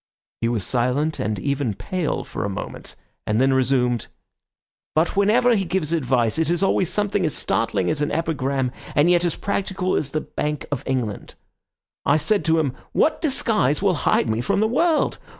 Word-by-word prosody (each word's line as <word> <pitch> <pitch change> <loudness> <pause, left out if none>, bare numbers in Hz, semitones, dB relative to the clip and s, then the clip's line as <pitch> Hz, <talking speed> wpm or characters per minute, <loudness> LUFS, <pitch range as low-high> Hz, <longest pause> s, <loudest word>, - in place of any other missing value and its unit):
He 115 - +1
was 115 -5 -1
silent 130 +6 0
and 110 -1 -1
even 135 +1 -1
pale 180 - -2
for - - -5
a 100 - -2
moment, 100 - -6 0.3
and 105 +1 +1
then 135 +1 +3
resumed— 125 -2 +1 0.9
"But 160 +2 +2
whenever 230 +5 +4
he 195 - +1
gives 170 -3 -1
advice 130 -4 +1
it 160 -1 +1
is 175 +2 +1
always 190 -2 +2
something 205 0 0
as 155 - 0
startling 115 - 0
as 155 -1 0
an 145 - 0
epigram, 140 -5 -1 0.2
and 155 +4 +4
yet 175 -1 +3
as 170 - 0
practical 190 -2 -2
as 140 - 0
the 155 +2 -2
Bank 150 -1 -3
of 145 - -2
England. 125 -6 -3 0.7
I 150 - +3
said 195 +7 +1
to 160 0 +3
him, 140 -5 0 0.2
'What 315 - +2
disguise 215 - +1
will 195 -2 +3 0.2
hide - - +3
me 110 +1 0
from 120 - 0
the 215 - +3
world? 315 +7 +1
150 Hz, 185 wpm, -22 LUFS, 130-185 Hz, 0.9 s, whenever